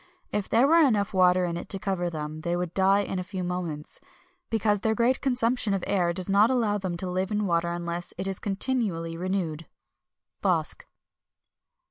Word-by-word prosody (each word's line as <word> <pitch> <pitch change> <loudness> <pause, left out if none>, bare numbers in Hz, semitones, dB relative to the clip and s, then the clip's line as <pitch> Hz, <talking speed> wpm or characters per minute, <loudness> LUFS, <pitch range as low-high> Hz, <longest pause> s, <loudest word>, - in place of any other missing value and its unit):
If 205 -2 -2
there 235 +4 +4
were 330 +3 +5
enough 220 -11 +3
water 180 -1 +4
in 170 -1 -2
it - - -7
to 195 - -2
cover 190 -2 -1
them, 155 -1 -5
they 170 +1 -1
would 175 -1 -3
die 195 +1 +4
in 190 -2 -3
a - - -2
few 185 0 -5
moments, 175 -4 -4 0.5
because 210 -2 +1
their 220 0 +1
great 240 +3 +2
consumption 245 -5 +1
of 190 - -3
air 175 -3 +1
does 180 +1 -4
not 205 +3 +4
allow 225 -5 +1
them 185 -3 -3
to 185 - -3
live 185 +1 -1
in 210 0 0
water 170 -2 +1
unless 175 0 -4
it 190 +2 -3
is 195 -1 -3
continually 195 -6 -1
renewed." 170 -3 -3 0.7
BOSC. - - 0
190 Hz, 185 wpm, -27 LUFS, 175-210 Hz, 0.7 s, were